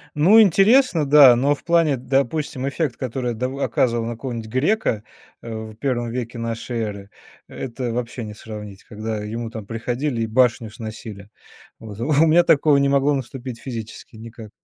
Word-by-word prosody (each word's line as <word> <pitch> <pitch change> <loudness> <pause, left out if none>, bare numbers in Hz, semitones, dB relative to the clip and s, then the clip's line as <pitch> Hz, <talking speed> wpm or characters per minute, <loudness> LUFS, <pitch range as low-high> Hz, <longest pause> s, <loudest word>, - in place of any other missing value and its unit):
Ну, 190 +10 +6
интересно, 200 - +4
да, 140 -3 +8
но 140 +4 +2
в - - -20
плане, 165 -5 +2
допустим, 135 +1 -1
эффект, 140 -3 -2
который 125 -1 -3
дав 125 +3 -3
оказывал 120 -4 0
на 120 - -3
какого-то 115 -2 -6
грека, 130 - 0 0.4
э, 115 - -9 0.2
в - - -15
1 120 0 -2
веке 120 0 -5
нашей 115 +1 -4
эры, 100 -2 -6 0.4
это 125 -1 -5
вообще 120 +1 -4
не 105 -1 -7
сравнить, 105 -2 -10
когда 110 0 -5
ему 115 +2 -5
там 110 -3 -8
приходили 120 +4 -3
и 115 - -1
башню 115 -1 +2
сносили. 110 -2 -9 0.5
Вот 105 -2 -10
у 145 +6 +3
меня 165 +2 +5
такого 145 -2 +4
не 140 0 +2
могло 140 +1 +2
наступить 130 -2 -5
физически 115 -2 -8
никак. 110 -1 -11
120 Hz, 165 wpm, -21 LUFS, 115-140 Hz, 0.5 s, да